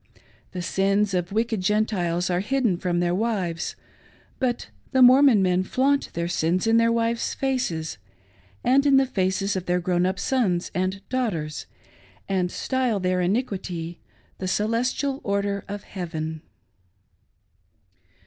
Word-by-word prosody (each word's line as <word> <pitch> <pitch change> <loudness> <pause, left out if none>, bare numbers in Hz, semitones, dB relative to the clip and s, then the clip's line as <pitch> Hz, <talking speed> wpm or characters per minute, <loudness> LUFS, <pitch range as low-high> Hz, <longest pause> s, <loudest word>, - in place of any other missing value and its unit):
The 180 -1 -5
sins 195 +2 +1
of 180 0 -1
wicked 225 -1 0
Gentiles 185 -4 0
are 175 - +1
hidden 235 -1 +1
from 175 -1 -1
their 175 0 +1
wives; 190 -5 -1 0.6
but 250 -3 -1 0.2
the 260 -1 +6
Mormon 255 -4 +7
men 180 0 +2
flaunt 270 +8 +1
their 170 0 -2
sins 175 +2 0
in 225 0 +4
their 230 0 +4
wives' 230 0 0
faces, 245 - -2 0.6
and 265 +3 +4
in 275 -1 +6
the 270 - +4
faces 195 -3 0
of 185 -1 -4
their 180 0 +2
grown 180 0 +1
up 190 - -2
sons 195 -10 0
and 190 +2 -2
daughters, 180 - -2 0.6
and 185 -2 0
style 255 -5 0
their 185 0 0
iniquity 180 -5 -2 0.2
" - - -36
The 185 - -3
Celestial 245 +7 0
Order 200 0 -1
of 205 0 -6
Heaven 160 -4 -5
195 Hz, 140 wpm, -24 LUFS, 180-235 Hz, 0.6 s, Mormon